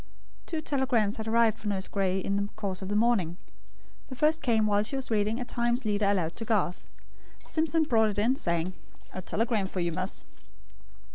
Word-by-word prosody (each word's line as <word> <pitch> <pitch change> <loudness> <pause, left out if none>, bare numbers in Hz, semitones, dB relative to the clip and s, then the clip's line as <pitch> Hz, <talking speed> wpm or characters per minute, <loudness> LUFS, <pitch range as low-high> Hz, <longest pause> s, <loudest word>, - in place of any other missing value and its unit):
Two 320 -2 -2
telegrams 255 -8 +1
had 220 0 -5
arrived 225 -1 +3
for 210 - -6
Nurse 195 -2 -1
Gray 190 -2 0
in 195 +1 -1
the 200 0 -1
course 200 -3 -3
of 190 - -5
the 205 - -1
morning. 210 -7 +2 0.7
The 260 - -7
first 310 +4 +2
came 225 -5 +2
while 205 -1 +3
she 215 +6 -3
was 265 -3 -4
reading 215 +2 +1
a 250 - -3
Times 240 +1 0
leader 205 -1 +1
aloud 180 -5 +1
to 230 - -4
Garth. 210 -5 -1 0.5
Simpson 320 0 0
brought 225 -7 +3
it 205 - -5
in, 230 +6 +3
saying: 170 -5 -1 0.4
"A 185 - -4
telegram 215 +1 0
for 190 - -5
you, 170 -1 0
miss." 185 +3 -3
215 Hz, 195 wpm, -28 LUFS, 195-240 Hz, 0.7 s, arrived